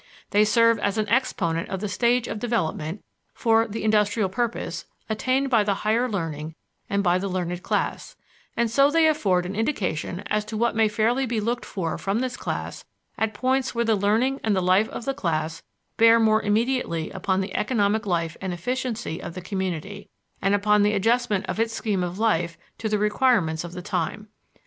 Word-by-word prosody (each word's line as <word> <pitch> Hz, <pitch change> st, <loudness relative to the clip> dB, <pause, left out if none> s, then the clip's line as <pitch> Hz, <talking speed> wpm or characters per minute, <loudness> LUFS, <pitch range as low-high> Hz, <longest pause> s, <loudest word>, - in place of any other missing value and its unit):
They 210 Hz, +1 st, +5 dB
serve 230 Hz, +1 st, +4 dB
as 200 Hz, +1 st, -1 dB
an 215 Hz, -, 0 dB
exponent 180 Hz, -9 st, 0 dB
of 190 Hz, -, -3 dB
the 210 Hz, -, -3 dB
stage 235 Hz, +5 st, +1 dB
of 215 Hz, -, -4 dB
development, 195 Hz, -6 st, -2 dB, 0.3 s
for 225 Hz, 0 st, +3 dB
the 225 Hz, +1 st, -5 dB
industrial 210 Hz, -1 st, +2 dB
purpose, 235 Hz, +4 st, -3 dB, 0.2 s
attained 260 Hz, +5 st, 0 dB
by 225 Hz, -4 st, +5 dB
the 200 Hz, -1 st, 0 dB
higher 235 Hz, +4 st, +2 dB
learning 160 Hz, -6 st, -4 dB, 0.3 s
and 200 Hz, 0 st, +1 dB
by 180 Hz, -1 st, +3 dB
the 200 Hz, -, -2 dB
learned 180 Hz, -1 st, -3 dB
class, -, -, -2 dB, 0.4 s
and 235 Hz, -1 st, +1 dB
so 275 Hz, +4 st, +5 dB
they 325 Hz, +1 st, +4 dB
afford 190 Hz, -, +2 dB
an 190 Hz, +2 st, -5 dB
indication 195 Hz, -, -2 dB
as 210 Hz, 0 st, 0 dB
to 215 Hz, 0 st, -5 dB
what 235 Hz, +1 st, +1 dB
may 225 Hz, -1 st, +4 dB
fairly 230 Hz, +5 st, +1 dB
be 230 Hz, -1 st, -1 dB
looked 235 Hz, +3 st, -2 dB
for 170 Hz, -5 st, -3 dB
from 195 Hz, +2 st, -1 dB
this 250 Hz, 0 st, -2 dB
class -, -, -5 dB, 0.3 s
at 220 Hz, -1 st, -1 dB
points 260 Hz, +2 st, 0 dB
where 235 Hz, 0 st, +1 dB
the 225 Hz, -, +3 dB
learning 225 Hz, +7 st, +1 dB
and 215 Hz, -2 st, +2 dB
the -, -, +2 dB
life 185 Hz, +4 st, +3 dB
of 230 Hz, -, -7 dB
the 275 Hz, -, 0 dB
class 160 Hz, -, -2 dB, 0.4 s
bear 230 Hz, 0 st, +6 dB
more 220 Hz, -1 st, +4 dB
immediately 210 Hz, -6 st, 0 dB
upon 190 Hz, 0 st, -1 dB
the 190 Hz, 0 st, -5 dB
economic 210 Hz, -2 st, +1 dB
life 165 Hz, -3 st, -1 dB
and 190 Hz, -2 st, -3 dB
efficiency 235 Hz, -1 st, -3 dB
of 170 Hz, -, -7 dB
the -, -, -4 dB
community, 190 Hz, 0 st, -4 dB, 0.3 s
and 195 Hz, +1 st, +3 dB
upon 210 Hz, +1 st, +3 dB
the 210 Hz, +1 st, +3 dB
adjustment 225 Hz, 0 st, +1 dB
of -, -, -4 dB
its 225 Hz, 0 st, 0 dB
scheme 205 Hz, -6 st, -1 dB
of 175 Hz, +1 st, -4 dB
life 170 Hz, -7 st, +1 dB, 0.2 s
to 220 Hz, -, -2 dB
the 210 Hz, -, +1 dB
requirements 210 Hz, -, +2 dB
of 175 Hz, 0 st, -8 dB
the 180 Hz, 0 st, -7 dB
time. 205 Hz, +3 st, -3 dB
210 Hz, 190 wpm, -24 LUFS, 185-230 Hz, 0.4 s, bear